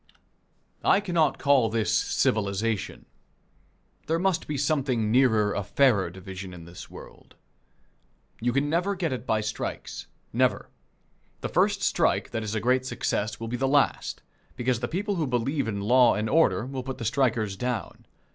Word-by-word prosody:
I 195 - +5
cannot 170 -7 +1
call 140 -5 +3
this 110 0 0
civilization. 105 0 0 1.0
There 165 +2 +1
must 185 0 0
be 150 - -2
something 135 -6 0
nearer 110 -5 +3
a - - -1
fairer 100 -2 +3
division 95 0 -8
in 85 -2 -11
this 85 +1 -11
world. - - -13 1.0
You 120 +2 0
can 140 +3 +1
never 175 +6 0
get 170 -6 -1
it 130 0 -6
by 110 -1 +1
strikes. 110 +1 -5 0.3
Never. - - +1 0.7
The - - -3
first - - +2
strike - - +1
that 115 - -2
is 110 0 -4
a - - +1
great 125 +3 +2
success 110 -3 -2
will 115 - -5
be 120 +2 -3
the 135 +2 0
last, 140 0 +1 0.3
because 125 -1 0
the 120 - -2
people 200 - -2
who 155 -4 0
believe 130 +2 -1
in 100 -2 -3
law 120 +3 +5
and 105 +1 -1
order 110 - +3
will 135 0 -5
put 130 0 -6
the 115 - -5
strikers 115 -4 +1
down. 125 0 -4
125 Hz, 165 wpm, -26 LUFS, 110-140 Hz, 1.0 s, I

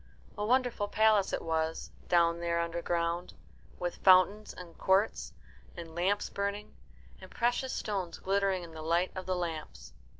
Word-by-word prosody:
A 210 - -3
wonderful 245 -2 +1
palace 215 -2 +3
it - - -2
was, 160 0 -2 0.2
down 170 -1 +3
there 170 0 0
underground, 170 +1 -2 0.4
with 175 -1 -3
fountains 190 +3 +5
and 175 -2 -11
courts, 195 +3 +1 0.5
and 165 -2 -8
lamps 185 +5 0
burning, 200 +1 -4 0.5
and - - -11
precious 245 +2 0
stones 195 -5 -3
glittering 195 -1 0
in 170 - -10
the 160 -1 -8
light 170 +3 +1
of 185 0 -6
the 185 - 0
lamps. 155 - -5
180 Hz, 145 wpm, -31 LUFS, 170-200 Hz, 0.5 s, fountains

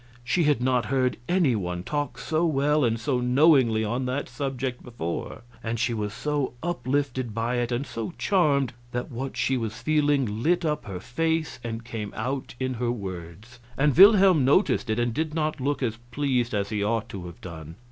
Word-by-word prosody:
She 165 +7 +1
had 145 -5 +2
not 125 -2 +2
heard 130 -2 +1
any 175 -9 +3
one 90 -3 -3
talk 145 +3 -3
so 160 +1 -1
well 150 -1 +2
and 115 -2 +1
so 125 +1 0
knowingly 125 -4 +4
on 125 +4 -1
that 130 +3 -2
subject 130 -3 -3
before, 115 -4 -5 0.2
and 115 0 -3
she 120 0 +1
was 105 -2 -2
so 145 +3 -2
uplifted 130 -6 -1
by 115 +2 0
it 120 0 -1
and 120 +4 -1
so 115 +3 -5
charmed 145 - +2 0.2
that 125 0 -3
what 130 +3 -5
she 130 - +1
was 115 -1 -4
feeling 145 -8 +1
lit 175 +4 +2
up 150 -1 -1
her 95 -3 -5
face 160 - -1
and 115 0 -5
came 110 -4 -5
out 130 +3 -3
in 130 0 -1
her 120 0 -1
words; 100 +2 -7 0.2
and 145 0 +3
Wilhelm 195 -5 +7
noticed 135 - +3
it 110 - +1
and 120 -1 0
did 155 +2 -2
not 155 -3 -1
look 140 +1 -1
as 115 -2 -1
pleased 125 -5 0
as 100 -1 -1
he 105 -1 -1
ought 115 +1 0
to 90 -3 -7
have 85 - -11
done. 80 -2 -9
125 Hz, 190 wpm, -26 LUFS, 115-145 Hz, 0.2 s, Wilhelm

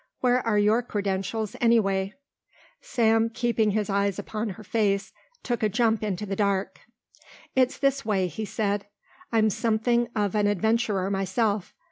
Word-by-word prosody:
Where 250 0 +3
are 225 -3 +1
your 210 +3 +3
credentials, 200 -1 -3
anyway?" 195 -4 +2 0.7
Sam, 225 -1 +2
keeping 230 -2 +1
his 210 0 0
eyes 200 -1 0
upon 215 0 -4
her - - -10
face, 200 -3 0 0.3
took 240 -3 -2
a 215 - +2
jump 225 0 +1
into 210 -1 -2
the 195 -1 -3
dark. 200 -1 0 0.8
"It's 255 0 +2
this 275 0 +1
way," 200 -4 +1
he 180 +5 -5
said, 205 -1 -2 0.4
"I'm 220 -2 +3
something 235 +3 +1
of 205 -3 0
an 210 -1 +2
adventurer 205 -1 +1
myself. 195 +1 -1
215 Hz, 145 wpm, -26 LUFS, 200-230 Hz, 0.8 s, Where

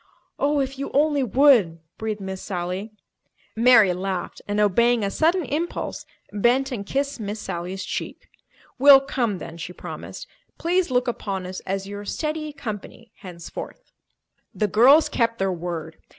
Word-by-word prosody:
"Oh, 290 +1 +2
if 270 0 -2
you 275 - -3
only 290 0 +3
would!" 245 - +4 0.2
breathed 215 -2 -3
Miss 190 -1 -5
Sally. 185 +3 -4 0.6
Mary 225 -5 +6
laughed 185 0 -4
and, 205 0 -1
obeying 230 +3 +3
a 200 - -1
sudden 335 - +2
impulse, 315 +7 -3 0.3
bent 245 +6 +2
and 225 -6 -3
kissed 280 0 -2
Miss 210 0 -4
Sally's 185 0 -5
cheek. - - -5 0.5
"We'll 275 0 +9
come 240 -7 -1
then," 165 -2 -9
she 175 +2 -7
promised. - - -8 0.3
"Please 350 +1 +1
look 250 0 +1
upon 195 -5 -3
us 185 +1 -6
as 195 0 -2
your 205 0 -7
'steady 305 +7 -3
company' 230 -4 -8
henceforth." 180 - -9 0.6
The 210 - +1
girls 260 - +6
kept 230 -1 0
their 195 -1 0
word. 165 -2 -5
220 Hz, 150 wpm, -23 LUFS, 190-275 Hz, 0.6 s, We'll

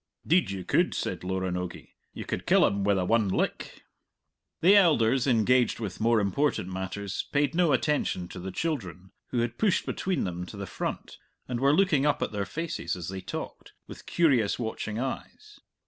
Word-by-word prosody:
"Deed 175 +2 +3
you 95 -1 -4
could," - - +2
said - - -3
Loranogie; 90 -1 -3 0.2
"you - - -7
could - - -4
kill - - +5
him 100 0 0
wi' 100 0 +3
the 95 -1 0
one 115 +1 +2
lick." - - -2 0.8
The 190 +5 +7
elders, 135 - +4
engaged 125 0 +3
with 100 -5 -5
more 115 0 +4
important 105 0 0
matters, 95 +2 -4
paid 145 0 +1
no 170 -2 +3
attention 135 - 0
to 90 - -8
the 95 +2 -5
children, 95 - -4 0.2
who 120 - -1
had 120 0 -3
pushed 205 -4 +2
between 185 -2 -1
them 90 0 -4
to 100 - -9
the 100 - -4
front - - -5 0.3
and 125 -2 -3
were 140 +2 +4
looking 185 -7 +3
up 150 - +1
at - - -3
their 100 -2 -3
faces, 165 0 -3
as 90 -2 -6
they 95 0 -5
talked, - - -7
with - - -12
curious 130 -11 +2
watching 110 -2 -4
eyes. 135 - -6
115 Hz, 180 wpm, -28 LUFS, 95-145 Hz, 0.8 s, The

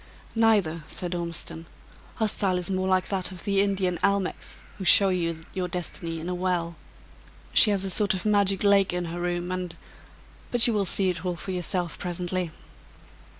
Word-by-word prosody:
"Neither," 205 -8 +2
said 180 -1 -4
Ormiston, 170 -1 -5 0.5
"her 220 - +1
style 195 -3 +1
in 180 +1 -2
more 185 0 -1
like 185 -1 +1
that 190 -2 -2
of 185 - -9
the 200 -1 +2
Indian 190 -3 0
almechs, 200 -1 -1 0.2
who - - -4
show 195 +2 +7
you 170 -3 -1
your 185 -2 -2
destiny 170 -1 -4
in 160 - -6
a 180 - -2
well. 175 -2 -1 0.8
She 220 - +7
has 195 -2 +1
a 190 - 0
sort 200 +1 +2
of 185 - -5
magic 200 -2 +2
lake 200 -2 +4
in 180 0 -2
her 170 +1 -5
room, 175 0 -2
and 180 -2 -4 0.7
but 245 -1 +5
you 235 - +2
will 205 -2 +1
see 190 +1 +4
it 180 - -7
all 180 -1 -2
for 190 +3 -6
yourself 180 -1 -2
presently." 180 0 -2
185 Hz, 185 wpm, -26 LUFS, 175-195 Hz, 0.8 s, show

